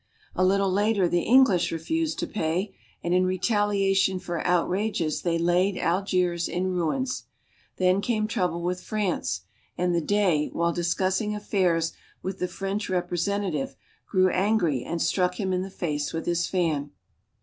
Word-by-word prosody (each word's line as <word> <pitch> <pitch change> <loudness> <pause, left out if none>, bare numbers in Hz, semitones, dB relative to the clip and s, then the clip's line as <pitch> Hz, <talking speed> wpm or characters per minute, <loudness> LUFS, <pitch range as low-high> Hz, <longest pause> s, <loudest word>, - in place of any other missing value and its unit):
A 185 - +1
little 195 +1 +3
later 205 -1 +2
the 175 0 +1
English 245 -6 +4
refused 310 - -1
to - - -1
pay, 185 +2 -2 0.3
and 175 - 0
in 180 0 +4
retalia 195 +1 +1
tion 190 -1 +2
for 175 -2 -4
outrages 180 -1 0
they 170 -1 0
laid 180 +3 +2
Algiers 180 -1 0
in 185 +1 -1
ruins. 250 +10 -1 0.5
Then 185 +1 +3
came 215 0 0
trouble 180 -6 -1
with 180 +1 -2
France, 190 - -2 0.4
and 180 0 +1
the 170 - +2
Dey, 180 -4 +2
while 170 0 +1
discussing 185 +5 0
affairs 180 -6 +1 0.3
with 190 0 -4
the 180 - 0
French 195 +3 -3
representative, 180 -3 -1 0.3
grew 185 -2 +4
angry 180 - +1
and 170 - -3
struck 180 +1 +1
him 190 -2 0
in 180 - 0
the 190 - -5
face 150 -6 -3
with 165 - -3
his 175 0 0
fan. 160 -6 0
185 Hz, 155 wpm, -26 LUFS, 170-200 Hz, 0.5 s, English